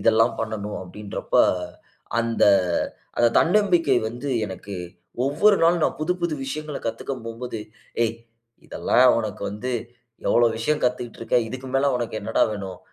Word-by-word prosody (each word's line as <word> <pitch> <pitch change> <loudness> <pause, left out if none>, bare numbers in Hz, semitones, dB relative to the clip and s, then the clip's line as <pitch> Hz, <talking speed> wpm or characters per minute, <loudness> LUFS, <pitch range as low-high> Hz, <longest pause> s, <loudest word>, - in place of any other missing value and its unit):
இதெல்லாம் 115 +1 +4
பண்ணணும் 110 -2 -4
அப்டின்றப்ப, 100 +3 -4 0.8
அந்த 115 0 +2 0.7
அந்த 120 - +5
தன்னம்பிக்கை 175 -7 +3
வந்து 120 +5 -6 0.2
எனக்கு 95 +1 -8 0.5
ஒவ்வொரு 180 +9 +4
நாளும், 170 -1 +4
நான் - - -1
புது 155 +4 +1
புது 170 -3 0
விஷயங்கள 150 +1 -4
கத்துக்க 115 +4 -3
போம்போது. 115 0 -5 0.5
"ஏய் 115 0 -2 0.5
இதெல்லாம் 125 0 +4
உனக்கு 110 -4 -4
வந்து 120 +5 -4 0.6
எவ்ளோ 120 0 +5
விஷயம் 150 +7 0
கத்துக்கிட்டு 125 -2 -2
இருக்க. 115 +2 +1
இதுக்கு 130 +2 -7
மேல 135 +1 +3
உனக்கு 120 -2 -3
என்னடா - - +1
வேணும்? 95 -3 -6
120 Hz, 135 wpm, -24 LUFS, 110-145 Hz, 0.8 s, அந்த